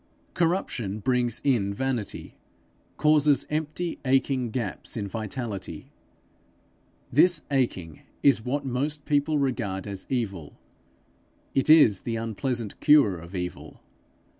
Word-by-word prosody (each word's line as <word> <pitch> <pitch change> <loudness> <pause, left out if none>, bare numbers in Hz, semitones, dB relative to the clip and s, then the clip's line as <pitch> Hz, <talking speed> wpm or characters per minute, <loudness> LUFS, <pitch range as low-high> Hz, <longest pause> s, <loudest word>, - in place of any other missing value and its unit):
Corruption 160 - -1
brings 120 +1 0
in 105 -8 +1
vanity, 130 -3 -3 0.6
causes 150 -2 +3
empty 155 +3 -3
aching 130 -2 +1
gaps 115 -2 -4
in 100 -2 -3
vitality. 110 0 -6 1.2
This 165 +3 +4
aching 95 - -1 0.2
is 135 -6 +4
what 140 +4 -2
most 140 +4 -2
people 150 +1 +1
regard 120 -9 -1
as 100 -2 -6
evil: 100 - -3 1.0
it 135 +2 +1
is 145 -11 +7
the 115 - -4
unpleasant 115 0 -3
cure 140 - +5
of 85 +4 -10
evil. 90 -1 -6
125 Hz, 110 wpm, -26 LUFS, 105-145 Hz, 1.2 s, is